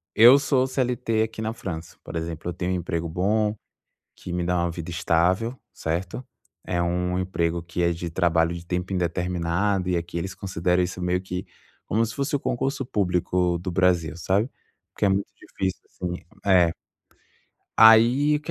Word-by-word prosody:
eu 120 +5 +9
sou 140 -2 +2
o - - 0
CLT, 125 -4 0
aqui 110 0 -5
na 110 0 -1
França, 85 -7 -7
por - - -8
exemplo, 80 0 -4
eu - - -3
tenho 90 +1 -2
um - - +1
emprego 85 -1 -2
bom, 105 +5 +1 0.6
que 90 - -8
me 90 0 -1
dá 90 +1 +1
uma 85 0 0
vida 85 0 -6
estável, 90 +7 +1 0.2
certo, 90 +9 -4 0.4
é 85 -1 0
um 90 +1 0
emprego 85 -2 -1
que 85 +1 -5
é 85 - +3
de 85 0 -5
trabalho 85 -1 +2
de 85 0 -8
tempo 90 +2 -2
indeterminado. 90 +2 0
E 90 - +1
aqui 85 0 -3
eles 95 +2 -4
consideram 90 -1 0
isso 90 +1 -3
meio 90 0 0
que 90 -1 -5 0.4
como 110 +3 +2
se 115 - -4
fosse 140 +1 -2
o 145 - +1
concurso 135 +2 -1
público 90 -4 0
do 90 +2 -4
Brasil, 90 -2 +2
sabe, 100 +8 0 0.5
que - - +1
é - - +5
muito 95 +1 0
difícil 95 -1 -4
assim 90 -1 -5 0.3
é. 90 -4 +5 1.1
Aí 120 +7 +7
o - - -5
que 150 - -24
90 Hz, 180 wpm, -25 LUFS, 85-110 Hz, 1.1 s, eu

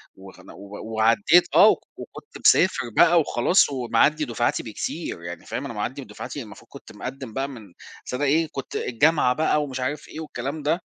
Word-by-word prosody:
و 95 0 -13 0.6
وعدّيت 115 +10 +4
آه، 205 - +8 0.3
وكنت 445 - -11
مسافر 155 -10 +4
بقى 170 0 +6
وخلاص 155 +5 +3
ومعدّي 140 +4 +1
دفعاتي 120 -2 -1
بكتير، 110 - -5
يعني 85 0 -8
فاهم، - - -5
أنا - - -6
معدّي - - -4
بدفعاتي - - -8
المفروض - - -14
كنت - - -12
مقدّم 130 -4 -8
بقى 135 +3 -2
من 110 -9 -12 0.3
بس - - -7
أنا 125 +3 -2
إيه 160 +4 +2
كنت 135 - -7
الجامعة 125 +1 +2
بقى 150 +1 +1
ومش 135 -3 -6
عارف 140 +4 -3
إيه 160 - -9
والكلام 145 0 -5
ده، 160 +5 0
135 Hz, 170 wpm, -24 LUFS, 120-155 Hz, 0.6 s, آه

